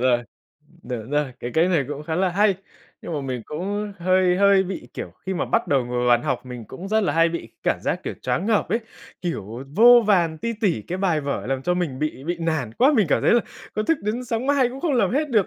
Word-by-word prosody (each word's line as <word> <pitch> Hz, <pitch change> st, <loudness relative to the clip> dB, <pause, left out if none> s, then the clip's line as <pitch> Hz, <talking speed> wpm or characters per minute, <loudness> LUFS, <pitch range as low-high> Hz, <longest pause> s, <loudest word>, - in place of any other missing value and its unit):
rồi. 125 Hz, -1 st, +3 dB, 0.6 s
Đúng 120 Hz, -1 st, -6 dB
rồi, 145 Hz, -2 st, 0 dB
cái 120 Hz, -, -4 dB
cách 170 Hz, +3 st, +3 dB
này 155 Hz, -6 st, +2 dB
cũng 145 Hz, 0 st, -5 dB
khá 160 Hz, +1 st, -3 dB
là 185 Hz, +1 st, +2 dB
hay. 200 Hz, +2 st, +3 dB, 0.5 s
Nhưng -, -, -6 dB
mà 150 Hz, -, -2 dB
mình 130 Hz, -3 st, -4 dB
cũng 200 Hz, +6 st, -4 dB
hơi 185 Hz, 0 st, +3 dB
hơi 200 Hz, 0 st, +5 dB
bị 185 Hz, -9 st, -6 dB
kiểu, -, -, -5 dB, 0.2 s
khi 190 Hz, -, -1 dB
mà -, -, -1 dB
bắt 230 Hz, -, 0 dB
đầu 135 Hz, -3 st, +2 dB
ngồi 120 Hz, 0 st, -3 dB
vào 125 Hz, -, +1 dB
bàn 120 Hz, 0 st, +4 dB
học -, -, -2 dB
mình 125 Hz, -2 st, -7 dB
cũng 175 Hz, -, -8 dB
rất 220 Hz, +1 st, +2 dB
là 185 Hz, -, +1 dB
hay 165 Hz, +1 st, +4 dB
bị 165 Hz, -9 st, -5 dB
cảm -, -, +1 dB
giác, -, -, -1 dB
kiểu, -, -, -3 dB
choáng 185 Hz, -, -1 dB
ngợp 220 Hz, -2 st, +2 dB
ấy, 225 Hz, -, 0 dB, 0.4 s
kiểu 125 Hz, -, -4 dB
vô 240 Hz, +2 st, +8 dB
vàn 170 Hz, -6 st, +2 dB
ti 230 Hz, +7 st, -2 dB
tỉ 180 Hz, -, +1 dB
cái 180 Hz, -, -5 dB
bài 175 Hz, -6 st, +1 dB
vở 140 Hz, -3 st, -3 dB
làm 135 Hz, 0 st, -2 dB
cho 180 Hz, -, +1 dB
mình 165 Hz, -8 st, -2 dB
bị 150 Hz, -3 st, -3 dB
bị 175 Hz, +3 st, -2 dB
nản 160 Hz, -9 st, -1 dB
quá. 275 Hz, +4 st, +5 dB
Mình 205 Hz, -5 st, +4 dB
cảm -, -, +2 dB
thấy -, -, +4 dB
là 240 Hz, -, +5 dB, 0.3 s
có 215 Hz, -, 0 dB
thức 325 Hz, +6 st, +1 dB
đến 220 Hz, +5 st, -2 dB
sáng 235 Hz, +1 st, -2 dB
mai 280 Hz, -3 st, +3 dB
cũng 260 Hz, +2 st, -8 dB
không 315 Hz, -2 st, 0 dB
làm 240 Hz, -, +2 dB
hết 295 Hz, +4 st, 0 dB
được, 215 Hz, -6 st, +3 dB
175 Hz, 260 wpm, -23 LUFS, 135-210 Hz, 0.6 s, vô